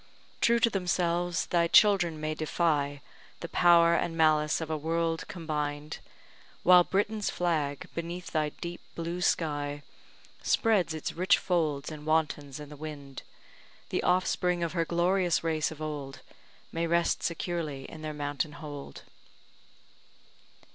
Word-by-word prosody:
True 235 0 +4
to 230 - +5
themselves, 175 -2 0
thy 170 -1 +2
children 175 -5 +5
may 155 0 -2
defy 150 -3 0 0.4
The 170 - -4
power 170 -1 +5
and 165 -1 0
malice 155 -1 +3
of 160 -1 -4
a - - 0
world 165 +1 -1
combined; 150 -3 -4 0.6
While 180 0 +8
Britain's 210 +3 0
flag, 155 -6 -1
beneath 170 +1 -5
thy 155 -2 +1
deep 170 +3 -7
blue 170 +2 -4
sky, 145 -4 0 0.6
Spreads 200 -8 +2
its 155 - -4
rich 185 +4 +3
folds 160 -6 -1
and 150 0 -9
wantons 150 -3 0
in 150 -1 -9
the 150 - -10
wind; 145 -3 -8 0.7
The - - 0
offspring 180 -1 +1
of 165 -1 -2
her 170 -2 +1
glorious 175 +1 +1
race 160 -2 0
of 155 -1 -8
old 145 -3 -5 0.5
May 165 +1 -1
rest 170 0 +1
securely 165 -5 -3
in 160 - -10
their 155 0 -4
mountain 145 0 -2
hold. 145 -2 -9
165 Hz, 135 wpm, -29 LUFS, 150-175 Hz, 0.7 s, While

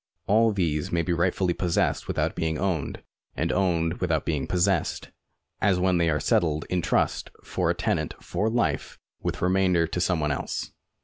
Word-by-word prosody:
All 110 +2 +4
these 80 -7 -1
may 85 -1 +1
be 90 - 0
rightfully 90 +1 +1
possessed 85 0 0
without - - 0
being 80 -1 -1
owned, 90 -6 -2 0.3
and 85 +2 0
owned 85 -3 +1
without 80 -4 0
being 75 -4 -1
possessed, 90 -1 0 0.5
as 100 -2 +3
when 90 -1 +2
they 85 -1 +3
are 75 -1 +1
settled 80 +1 +1
in 90 -1 +1
trust - - 0
for - - -1
a - - +2
tenant - - -1
for 110 - -1
life 120 +1 -1 0.2
with - - -3
remainder 90 -2 +3
to 85 +2 -3
some 90 -2 +1
one 75 -1 0
else. 70 - -3
85 Hz, 175 wpm, -26 LUFS, 80-95 Hz, 0.5 s, All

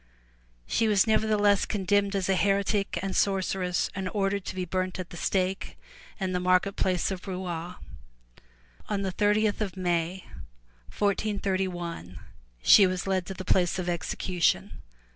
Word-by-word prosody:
*' - - -36
She 225 - +3
was 205 -3 +4
nevertheless 210 -2 +3
condemned 200 0 +1
as 190 -2 0
a 195 - +3
heretic 200 0 +1
and 195 -1 -3
sorceress 190 -2 +1
and 190 -1 -3
ordered 200 -1 -1
to - - -5
be 185 -1 -2
burnt 185 +1 -2
at 185 -1 -7
the - - -8
stake 190 +2 -1 0.4
in 190 -2 -1
the 180 - 0
market 185 +2 +2
place 185 0 0
at 190 +1 -6
Rouen. 180 -2 -4 1.1
On 200 -1 -1
the 190 - -1
thirtieth 210 +2 +1
of 195 -3 -3
May, 175 0 -1 0.6
1431, 185 - -2 0.4
she 200 -3 +8
was 185 -1 -3
led 190 -2 -1
to 190 - -5
the 185 +1 -7
place 180 -1 +2
of 185 - -2
execu 175 +1 -3
tion. - - +3
190 Hz, 155 wpm, -27 LUFS, 180-200 Hz, 1.1 s, she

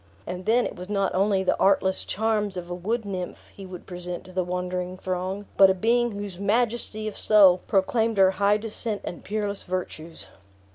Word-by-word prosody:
And 180 +1 -6
then 235 +2 +4
it - - -5
was 180 +1 -9
not 195 -2 0
only 195 0 +2
the 185 - +2
artless 190 -1 +2
charms 210 -2 -1
of 175 0 -6
a - - -1
wood 215 +6 -2
nymph 185 -3 -6
he 195 -1 -9
would 180 -1 -9
present 180 -1 -6
to 185 - -13
the 185 0 0
wondering 180 0 -3
throng, 185 +2 -3
but 195 -1 +8
a 190 - +2
being 235 +4 +2
whose 200 -3 -6
majesty 215 +1 0
of 215 - -5
soul 195 -4 +6
proclaimed 220 +3 +1
her 190 -1 +6
high 205 +2 +2
descent 215 0 -4
and 175 - -7
peerless 205 -1 -3
virtues. 170 -3 -5
195 Hz, 190 wpm, -25 LUFS, 180-210 Hz, -, but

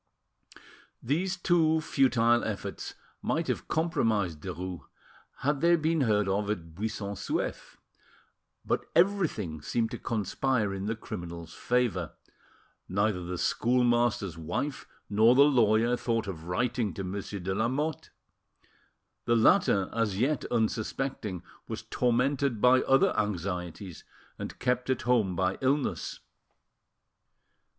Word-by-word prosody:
These 180 +9 0
two 165 -3 +3
futile 120 -6 +3
efforts 105 -3 -5 0.3
might - - -1
have - - -2
compromised 115 - 0
Derues 90 +2 -5 0.6
had 140 0 0
they 170 0 +5
been 160 -1 +1
heard 105 -5 +2
of 100 +1 0
at 85 -6 -4
Buisson 100 +1 -4
Souef; 100 0 -3 0.9
but - - 0
everything 165 - +1
seemed 115 +7 -1
to 120 - -5
conspire 110 0 -1
in 95 +1 -4
the 115 - -1
criminal's 85 -5 -7
favour: 120 -9 0 0.8
neither 100 0 +1
the 90 +1 -4
schoolmaster's 120 -6 +1
wife 90 - -3 0.2
nor 110 +4 +5
the 140 - +8
lawyer 120 -4 +4
thought 115 -2 -1
of 85 -5 -7
writing 115 +1 -1
to 95 - -4
Monsieur 100 +2 -5
de 95 +1 -2
Lamotte. 130 +9 -1 1.2
The 120 - +3
latter, 110 - +4
as 110 -4 0
yet 135 +6 +1
unsuspecting, 110 -3 -2 0.2
was - - -5
tormented 125 0 +1
by 125 +3 +5
other 135 0 +3
anxieties, 90 -3 -3 0.4
and - - -6
kept 125 0 0
at 130 - 0
home 110 -7 +2
by 95 +1 0
illness. 135 +1 -1
115 Hz, 120 wpm, -29 LUFS, 95-130 Hz, 1.2 s, the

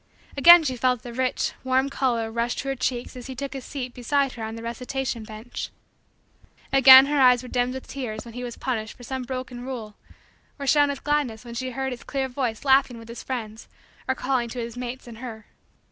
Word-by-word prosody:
Again 345 +4 +9
she 260 -4 -1
felt 250 -1 +1
the 240 - -8
rich, 255 +1 0
warm, 260 +1 +2
color 240 -5 -1
rush 235 +1 -1
to 275 - -4
her 270 - -1
cheeks 255 0 -2
as 250 0 -8
he 260 - -7
took 275 +1 -5
his 270 -2 -6
seat, 255 -3 -6
beside 275 +2 0
her 235 - -9
on 220 0 -5
the 230 - -8
recitation 250 +1 -3
bench. 215 +3 -7 1.0
Again 265 0 +10
her 290 0 +1
eyes 250 -1 +6
were - - -8
dimmed 250 +1 0
with 265 - -7
tears 240 -6 -5
when 230 - -10
he 250 +1 -6
was 240 -1 -6
punished 220 -4 -3
for 245 - -13
some 260 +1 -4
broken 255 -1 -6
rule 240 -5 -6 0.6
or 280 - -5
shone 290 +1 +4
with 280 -1 -5
gladness 280 -6 -1
when 235 - -8
she 255 +2 -3
heard 265 +1 -3
his 245 - -10
clear 270 -1 -2
voice 250 -2 -3
laughing 265 -3 +4
with 230 0 -12
his 235 - -7
friends 225 -4 -6 0.4
or 260 - +1
calling 255 -2 -1
to 245 - -6
his 235 0 -5
mates 245 +1 -6
and 230 -2 -11
her. 225 -4 -8
250 Hz, 220 wpm, -25 LUFS, 235-265 Hz, 1.0 s, Again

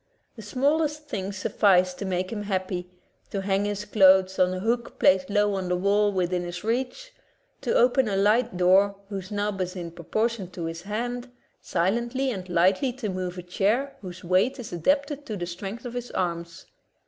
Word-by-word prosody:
The 225 - -9
smallest 295 +7 0
thing 195 -1 -3
suffices 190 -2 +3
to 195 - -6
make 185 0 -2
him 210 - -3
happy 185 -3 -3 0.2
— - - -40
to 195 -1 -3
hang 195 +1 +1
his 205 0 -3
clothes 190 -2 +5
on 180 0 +4
a 185 - -3
hook 235 +4 -1
placed 185 0 +4
low 205 0 +2
on 190 -2 -2
the 180 - +2
wall 205 +3 +2
within 180 -2 0
his 175 +1 -6
reach, 260 - -2 0.5
to - - 0
open 250 0 +4
a 195 - -1
light 210 +1 +2
door 190 +3 +4
whose 195 -2 -5
knob 205 -2 -2
is 180 0 -3
in 170 -2 -5
propor 175 +7 0
tion 220 -6 -6
to 170 - -4
his 165 +1 -5
hand, 240 +5 -4 0.3
silently 235 +9 0
and 185 -5 -6
lightly 185 +9 +3
to 240 -4 -4
move 185 -1 -4
a 180 - -6
chair 215 +10 0
whose 180 -2 -9
weight 185 +10 +2
is 240 -8 -8
adapted 280 - 0
to 215 - -3
the 175 - -3
strength 195 +7 -6
of 240 - -5
his 245 0 -5
arms. 170 -1 -3
200 Hz, 195 wpm, -26 LUFS, 185-235 Hz, 0.5 s, clothes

